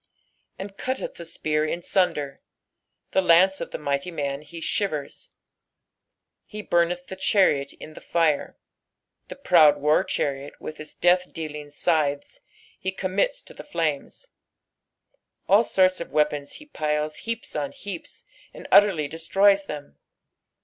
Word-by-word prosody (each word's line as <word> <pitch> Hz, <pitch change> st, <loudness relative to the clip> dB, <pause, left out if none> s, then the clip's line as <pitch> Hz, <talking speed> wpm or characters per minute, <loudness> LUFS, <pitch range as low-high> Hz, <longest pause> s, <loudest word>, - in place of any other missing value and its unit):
"And 195 Hz, +1 st, -8 dB
eiUteth 260 Hz, +1 st, -3 dB
the 170 Hz, -, -7 dB
near 150 Hz, 0 st, +2 dB
in 165 Hz, +3 st, -2 dB
mnder" 150 Hz, -7 st, 0 dB, 0.4 s
— -, -, -50 dB
Che -, -, +4 dB
lauce 185 Hz, +2 st, +4 dB
of -, -, -4 dB
the -, -, -5 dB
mighty 140 Hz, +2 st, -2 dB
man 140 Hz, -4 st, -3 dB
he 155 Hz, +3 st, -12 dB, 0.2 s
Rivera, 155 Hz, -9 st, -2 dB, 1.4 s
"fe 210 Hz, -1 st, -7 dB
btimeth 175 Hz, 0 st, +1 dB
the 190 Hz, -, -7 dB
ehariot 185 Hz, -8 st, +2 dB
in 155 Hz, -, -10 dB
the -, -, -12 dB
Jire"— 165 Hz, -4 st, 0 dB, 0.7 s
the -, -, -8 dB
proud 160 Hz, -, +5 dB
war 150 Hz, +2 st, +3 dB
chariot 140 Hz, 0 st, -3 dB
with 155 Hz, -, -8 dB
its 155 Hz, 0 st, -9 dB
death 180 Hz, +1 st, +2 dB
dealing 150 Hz, -2 st, -6 dB
scythes 145 Hz, -, -1 dB, 0.4 s
he 190 Hz, -1 st, -2 dB
commits 195 Hz, -, -1 dB
to -, -, -12 dB
the -, -, -10 dB
flnmes. -, -, -3 dB, 1.2 s
All 205 Hz, +4 st, +6 dB
sorts 185 Hz, -4 st, +2 dB
of -, -, -7 dB
weapons 150 Hz, -1 st, 0 dB
he 300 Hz, -, -9 dB
piles 150 Hz, -, -2 dB
heaps 230 Hz, 0 st, -5 dB
on 145 Hz, -2 st, -2 dB
heaps, 195 Hz, -5 st, -8 dB, 0.3 s
and -, -, -10 dB
utterly 190 Hz, -8 st, +5 dB
destroys 195 Hz, +6 st, +2 dB
them. 140 Hz, -, -8 dB
165 Hz, 140 wpm, -25 LUFS, 150-190 Hz, 1.4 s, All